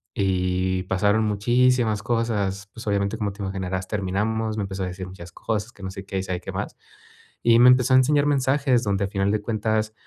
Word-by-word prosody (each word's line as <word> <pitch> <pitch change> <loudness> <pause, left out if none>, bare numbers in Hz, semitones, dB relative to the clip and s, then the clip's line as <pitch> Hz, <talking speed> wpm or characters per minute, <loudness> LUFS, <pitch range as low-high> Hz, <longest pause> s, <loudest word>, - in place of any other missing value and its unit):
y 95 -1 0
pasaron 100 +3 +1
muchísimas 115 +1 +2
cosas. 105 -4 -1
Pues, 115 -1 -10
obviamente, 100 +1 0
como 105 -3 -2
te 100 0 -7
imaginarás, 95 -1 -3
terminamos. 110 +2 -1
Me 105 - -1
empezó 95 -1 -4
a - - -2
decir 90 0 -6
muchas 90 -2 -11
cosas, 110 +1 -3
que 95 - -15
no 95 - -4
sé 95 0 -8
qué, 95 -1 -4
y - - -3
sabe 90 -1 -4
que - - -6
más. - - -5 0.7
Y 115 0 +5
me 125 +1 +8
empezó 125 0 +4
a - - +8
enseñar 145 +2 +3
mensajes, 135 -2 +2
donde 100 -1 0
a - - -3
final 100 0 0
de 110 - +1
cuentas, 110 0 -1
105 Hz, 210 wpm, -24 LUFS, 95-115 Hz, 0.7 s, me